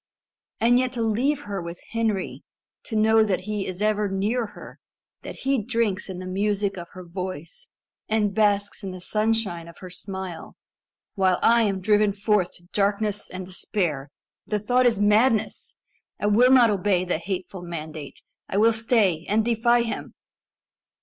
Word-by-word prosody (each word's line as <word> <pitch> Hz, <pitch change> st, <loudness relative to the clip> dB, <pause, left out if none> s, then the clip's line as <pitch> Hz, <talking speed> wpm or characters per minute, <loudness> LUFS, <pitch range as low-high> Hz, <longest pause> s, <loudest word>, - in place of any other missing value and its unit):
And 240 Hz, +2 st, +4 dB
yet 255 Hz, 0 st, -1 dB
to 235 Hz, -2 st, -1 dB
leave 255 Hz, +7 st, +1 dB
her 200 Hz, -5 st, -4 dB
with 170 Hz, +1 st, -7 dB
Henry 220 Hz, -4 st, -1 dB, 0.4 s
to 225 Hz, -, -5 dB
know 220 Hz, +1 st, +5 dB
that 200 Hz, -4 st, 0 dB
he 210 Hz, 0 st, -3 dB
is 185 Hz, +2 st, -4 dB
ever 210 Hz, -1 st, +1 dB
near 210 Hz, +5 st, 0 dB
her -, -, -11 dB, 0.4 s
that -, -, -8 dB
he 270 Hz, -3 st, +1 dB
drinks 220 Hz, -4 st, -1 dB
in 185 Hz, -, -5 dB
the 185 Hz, -, -7 dB
music 200 Hz, +1 st, -1 dB
of 175 Hz, -2 st, -8 dB
her 185 Hz, -1 st, -9 dB
voice, 175 Hz, -2 st, -6 dB, 0.4 s
and 210 Hz, -2 st, +1 dB
basks 205 Hz, -1 st, +1 dB
in 195 Hz, -, -4 dB
the 185 Hz, 0 st, -7 dB
sunshine 210 Hz, -4 st, 0 dB
of 170 Hz, -, -13 dB
her 185 Hz, -1 st, -10 dB
smile 190 Hz, -3 st, -6 dB, 0.6 s
while 190 Hz, -3 st, +2 dB
I 235 Hz, 0 st, +5 dB
am 195 Hz, -2 st, -1 dB
driven 210 Hz, +1 st, +3 dB
forth 205 Hz, -2 st, 0 dB
to 175 Hz, -, -16 dB
darkness 205 Hz, 0 st, 0 dB
and 185 Hz, 0 st, -6 dB
despair 175 Hz, -6 st, -2 dB, 0.4 s
the 210 Hz, -, 0 dB
thought 245 Hz, +4 st, +2 dB
is 230 Hz, -3 st, +2 dB
madness! 215 Hz, +2 st, +2 dB, 0.4 s
I -, -, -2 dB
will 230 Hz, +5 st, +5 dB
not 245 Hz, -4 st, +6 dB
obey 190 Hz, -2 st, +1 dB
the 180 Hz, -3 st, -1 dB
hateful 185 Hz, 0 st, -5 dB
mandate! 155 Hz, -4 st, -7 dB, 0.3 s
I 195 Hz, -, -1 dB
will 225 Hz, +2 st, +5 dB
stay 220 Hz, -8 st, +2 dB
and 215 Hz, +2 st, +2 dB
defy 235 Hz, +1 st, +3 dB
him!" 230 Hz, -, -5 dB
205 Hz, 165 wpm, -24 LUFS, 185-225 Hz, 0.6 s, not